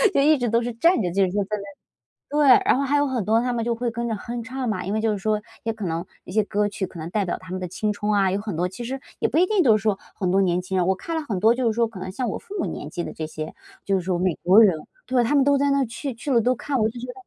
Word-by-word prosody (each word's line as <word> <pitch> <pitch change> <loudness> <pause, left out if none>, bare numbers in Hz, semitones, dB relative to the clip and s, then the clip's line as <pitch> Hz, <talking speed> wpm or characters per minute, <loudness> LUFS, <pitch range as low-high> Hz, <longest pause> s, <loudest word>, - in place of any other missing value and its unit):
就 275 - +5
一 305 +1 +5
直 245 - -1
都 230 +2 +2
是 240 0 -3
站 335 +3 +3
着 180 - -1
就 195 +3 +1
是 180 - -3
说 205 +1 0
在 210 +2 -3
那 200 - -7 0.7
对， 295 -2 +4 0.2
然 - - +4
后 280 - 0
还 280 +1 +1
有 290 - +3
很 255 -6 -1
多 220 +3 +3
他 250 +1 -1
们 230 -2 -1
就 235 -1 -1
会 240 -1 -2
跟 235 0 -3
着 225 - -1
哼 235 +3 -5
唱 255 +1 -4
嘛， 185 -4 -2
因 195 - -3
为 220 - 0
就 220 -1 +1
是 205 - -2
说， 215 +2 0 0.2
也 225 - -1
可 215 -3 -5
能 165 0 -2 0.2
一 - - -9
些 215 +2 +3
歌 205 0 0
曲 205 -1 -4
可 185 - -8
能 160 +1 -5
代 205 +1 0
表 180 - -2
他 185 0 -11
们 185 - -3
的 180 - -4
青春 210 +2 -2
啊， 200 -2 +3
有 200 - -1
很 205 -5 -5
多 180 +2 0
其 190 +6 -8
实 260 +3 -4 0.2
也 - - +2
不 310 - 0
一 360 - +5
定 415 -1 +2
都 225 -8 +5
是 210 - -4
说 210 -3 0 0.2
很 180 -2 0
多 195 - +4
年 180 -1 +1
轻 185 +1 -4
人， 180 - +2
我 190 - +2
看 330 - -5
了 320 - -1
很 215 -10 -3
多 220 +5 +4
就 245 -2 +1
是 - - 0
说 235 -1 +3
可 210 -5 -9
能 185 - -5
像 245 +6 -3
我 - - -2
父 405 - -11
母 - - -1
年 150 - -6
纪 175 - -4
的 - - -6
这 160 - -5
些， 155 0 -6 0.3
就 195 - 0
是 190 - +2
说 180 0 -1
美 180 -2 +1
国 185 +5 +7
人。 190 -7 +5 0.3
对 250 -2 +2
他 240 +5 +1
们 275 -2 +5
都 285 -1 +4
在 280 0 +2
那 275 -1 +2
去 255 +3 -5
去 240 +5 -6
了 235 - +5
都 250 +3 +1
看， 280 +3 -2
我 215 - +3
就 235 +2 -8
觉 240 - -6
得 - - -5
220 Hz, 370 characters per minute, -23 LUFS, 190-250 Hz, 0.7 s, 国